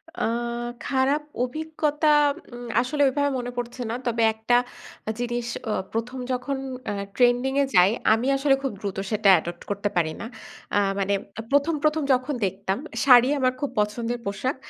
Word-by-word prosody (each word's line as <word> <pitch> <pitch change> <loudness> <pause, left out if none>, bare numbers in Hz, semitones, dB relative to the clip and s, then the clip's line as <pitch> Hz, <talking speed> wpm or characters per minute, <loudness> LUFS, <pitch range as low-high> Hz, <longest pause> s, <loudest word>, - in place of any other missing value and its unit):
আ - - -5 0.7
খারাপ 270 +3 +2 0.2
অভিজ্ঞতা 310 +2 -1 0.5
উম 240 0 -8
আসলে 290 +4 -2
এভাবে 285 +2 0
মনে 245 0 -4
পড়ছে 245 +1 -4
না। 230 - -2
তবে 230 -1 +1
একটা 220 +2 +2 0.6
জিনিস 240 -1 -2 0.2
আ - - +1 0.2
১ম 240 +3 -3
যখন 255 +2 -2 0.3
আ - - -2 0.2
ট্রেন্ডিং 245 +1 +3
এ - - +1
যাই 180 +1 +7 0.2
আমি 230 +4 0
আসলে 275 0 +3
খুব 270 - -1
দ্রুত 200 -2 -4
সেটা 210 -1 +3
অ্যাডপ্ট 175 0 -3
করতে 205 0 -1
পারি 165 -3 +2
না। - - -5 0.5
আ - - +5 0.2
মানে 200 +1 +1 0.3
আ - - -1
১ম, 285 +3 +3
১ম 305 0 +2
যখন 255 +3 0
দেখতাম 195 +1 -2 0.3
শাড়ি 250 -2 +7
আমার 255 -1 +2
খুব 285 - -2
পছন্দের 230 +3 -1
পোশাক। 200 +7 -2
245 Hz, 165 wpm, -25 LUFS, 220-275 Hz, 0.7 s, যাই